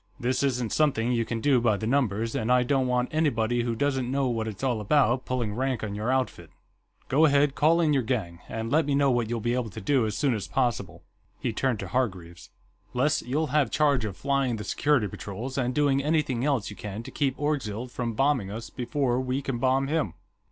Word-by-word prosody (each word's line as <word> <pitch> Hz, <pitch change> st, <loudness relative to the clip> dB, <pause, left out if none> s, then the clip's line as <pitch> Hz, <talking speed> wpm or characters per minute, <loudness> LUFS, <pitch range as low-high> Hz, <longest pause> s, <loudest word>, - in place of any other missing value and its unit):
This 125 Hz, +1 st, 0 dB
isn't 125 Hz, -5 st, 0 dB
something 130 Hz, -6 st, +2 dB
you 115 Hz, -2 st, +1 dB
can 115 Hz, 0 st, -3 dB
do 135 Hz, -3 st, +3 dB
by 110 Hz, -3 st, +2 dB
the 110 Hz, -, -4 dB
numbers, 115 Hz, -3 st, 0 dB
and 115 Hz, +2 st, -1 dB
I 125 Hz, 0 st, +5 dB
don't 130 Hz, 0 st, +1 dB
want 125 Hz, 0 st, 0 dB
anybody 120 Hz, -7 st, +1 dB
who 120 Hz, -1 st, -1 dB
doesn't 135 Hz, 0 st, 0 dB
know 135 Hz, +1 st, 0 dB
what 115 Hz, -2 st, -2 dB
it's 110 Hz, +3 st, -7 dB
all 120 Hz, -5 st, 0 dB
about 125 Hz, +2 st, +2 dB
pulling 120 Hz, -5 st, -2 dB
rank 130 Hz, 0 st, -1 dB
on 105 Hz, -2 st, -3 dB
your 105 Hz, +4 st, -1 dB
outfit. 130 Hz, -, -1 dB, 0.6 s
Go 145 Hz, +5 st, +4 dB
ahead, 145 Hz, -1 st, +3 dB
call 160 Hz, +4 st, +3 dB
in 155 Hz, -3 st, +3 dB
your 135 Hz, -, +3 dB
gang, 105 Hz, -9 st, -3 dB
and 115 Hz, +1 st, -4 dB
let 155 Hz, 0 st, +3 dB
me 140 Hz, -, +1 dB
know 140 Hz, -1 st, +3 dB
what 120 Hz, -3 st, 0 dB
you'll 120 Hz, 0 st, -1 dB
be 120 Hz, +2 st, 0 dB
able 125 Hz, -3 st, -1 dB
to 105 Hz, -, -8 dB
do, 125 Hz, +2 st, +2 dB
as 105 Hz, -, -3 dB
soon 140 Hz, -4 st, +2 dB
as 105 Hz, -3 st, -3 dB
possible." 125 Hz, -4 st, -1 dB, 0.4 s
He 115 Hz, -, -2 dB
turned 130 Hz, +1 st, 0 dB
to 100 Hz, -, -5 dB
Hargreaves. 95 Hz, -7 st, -3 dB, 0.5 s
"Les, 140 Hz, +5 st, +2 dB
you'll 145 Hz, +4 st, -2 dB
have 150 Hz, -3 st, +3 dB
charge 145 Hz, -5 st, +2 dB
of 100 Hz, -3 st, -4 dB
flying 140 Hz, -3 st, 0 dB
the 105 Hz, -, -5 dB
security 140 Hz, +1 st, +1 dB
patrols, 105 Hz, +7 st, -6 dB
and 125 Hz, -2 st, 0 dB
doing 140 Hz, -2 st, +2 dB
anything 150 Hz, -5 st, 0 dB
else 135 Hz, -8 st, 0 dB
you -, -, -9 dB
can 105 Hz, +2 st, -6 dB
to -, -, -9 dB
keep 135 Hz, -2 st, -1 dB
Orgzild 125 Hz, -6 st, -2 dB
from 120 Hz, -2 st, -3 dB
bombing 130 Hz, -4 st, +1 dB
us 110 Hz, +1 st, -7 dB
before 130 Hz, 0 st, -1 dB
we 130 Hz, +2 st, -2 dB
can 130 Hz, -3 st, -3 dB
bomb 130 Hz, +2 st, +2 dB
him. 145 Hz, -, -1 dB
125 Hz, 220 wpm, -27 LUFS, 110-140 Hz, 0.6 s, I